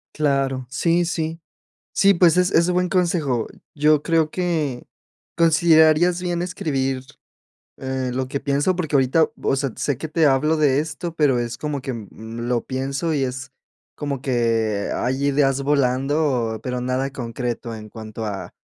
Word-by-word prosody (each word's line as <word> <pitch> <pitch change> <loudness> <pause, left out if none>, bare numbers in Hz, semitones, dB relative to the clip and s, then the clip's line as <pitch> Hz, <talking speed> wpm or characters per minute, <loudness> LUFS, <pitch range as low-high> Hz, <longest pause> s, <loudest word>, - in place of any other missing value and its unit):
Claro. 135 -3 0
Sí, 170 +6 +1
sí. 165 -1 -3 0.6
Sí, 200 0 +5
pues, 175 -1 +4
es 180 +1 +3
es 170 +1 +4
un - - +1
buen 180 0 +1
consejo. 165 - 0 0.3
Yo 150 0 +3
creo 160 0 +1
que 160 -8 -1 0.5
considerarías 165 +1 +4
bien 175 -1 -2
escribir, 135 -8 -2 0.7
eh, 130 -1 -3
lo 130 0 -2
que 140 +1 -3
pienso 145 +7 +1
porque 160 -5 -2
ahorita, 140 +4 +3
vo - - -3
o - - +3
sea, 135 -1 -1
sé 140 -4 -1
que 160 - -5
te 155 +1 +2
hablo 145 +4 +2
de 145 -3 +3
esto, 160 +2 -4
pero 145 -6 +3
es 120 0 -3
como 150 -2 -3
que, 130 - -4
mm, 110 +1 -8
lo 120 -2 0
pienso 135 +5 -2
y 140 -3 +1
es 130 0 -5 0.4
como 140 -3 -4
que 115 -5 0
hay 130 +3 -1
ideas 140 -1 +2
volando, 135 -3 +1
pero 125 -1 -2
nada 130 +2 -1
concreto 120 -2 -4
en 110 -1 -10
cuanto 110 0 -7
a 100 -2 -5
140 Hz, 165 wpm, -22 LUFS, 125-160 Hz, 0.7 s, Sí